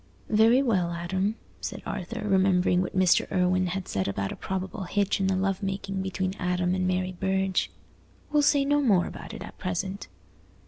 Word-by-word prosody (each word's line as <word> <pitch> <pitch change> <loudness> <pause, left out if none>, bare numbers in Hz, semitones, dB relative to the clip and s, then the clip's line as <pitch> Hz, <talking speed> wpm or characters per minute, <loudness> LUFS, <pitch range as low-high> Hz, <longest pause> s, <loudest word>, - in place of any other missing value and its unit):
"Very 225 +5 +5
well, 185 -9 +1
Adam," 190 +5 -1 0.2
said - - -6
Arthur, 200 +1 -4
remembering 185 -2 +3
what 185 +1 -3
Mr. 185 -2 +3
Irwine 185 0 +2
had 185 +1 -3
said 95 -1 -1
about 100 0 -2
a - - -5
probable 190 +1 -4
hitch 200 +2 0
in 190 - +1
the 190 - +2
love 195 +1 0
making 195 0 -3
between 190 0 -2
Adam 180 0 0
and 185 0 0
Mary 185 0 0
Burge, 190 +1 0 0.6
"we'll 295 0 +4
say 285 -1 +3
no 290 +1 +3
more 200 -10 +3
about - - -8
it 220 - -7
at - - -11
present. 190 +2 -3
190 Hz, 180 wpm, -27 LUFS, 180-200 Hz, 0.6 s, Very